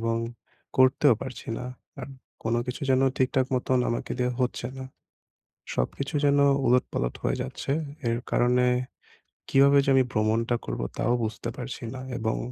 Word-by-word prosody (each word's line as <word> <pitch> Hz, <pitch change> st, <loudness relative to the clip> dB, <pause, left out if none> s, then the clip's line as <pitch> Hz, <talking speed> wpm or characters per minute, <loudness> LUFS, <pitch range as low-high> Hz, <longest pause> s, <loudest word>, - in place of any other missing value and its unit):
এবং 115 Hz, 0 st, 0 dB, 0.6 s
করতেও 130 Hz, 0 st, +5 dB
পারছি 130 Hz, -2 st, -8 dB
না। 125 Hz, -, -5 dB, 0.4 s
আর 125 Hz, -, -6 dB, 0.3 s
কোনো 115 Hz, +1 st, +1 dB
কিছু 125 Hz, +2 st, -5 dB
যেন 130 Hz, 0 st, +4 dB
ঠিকঠাক 130 Hz, 0 st, +2 dB
মতন 130 Hz, 0 st, +1 dB
আমাকে 120 Hz, -, -2 dB
দিয়ে 125 Hz, 0 st, +1 dB
হচ্ছে 125 Hz, -1 st, -1 dB
না, 130 Hz, -, -5 dB, 0.9 s
সবকিছু 135 Hz, -, -2 dB
যেন 145 Hz, 0 st, +4 dB, 0.3 s
উলট-পালট 125 Hz, -, +1 dB
হয়ে -, -, 0 dB
যাচ্ছে 65 Hz, -, -4 dB, 0.4 s
এর 115 Hz, -, +1 dB
কারণে 125 Hz, +1 st, +3 dB, 0.8 s
কিভাবে 140 Hz, +1 st, +6 dB
যে -, -, +1 dB
আমি 130 Hz, -, +5 dB
ভ্রমণটা 110 Hz, +2 st, +1 dB
করবো -, -, -3 dB
তাও 120 Hz, -, +1 dB
বুঝতে 110 Hz, +1 st, -3 dB
পারছি 125 Hz, -1 st, -6 dB
না 130 Hz, -, -6 dB, 0.2 s
এবং 110 Hz, 0 st, -1 dB
125 Hz, 150 wpm, -26 LUFS, 115-130 Hz, 0.9 s, কিভাবে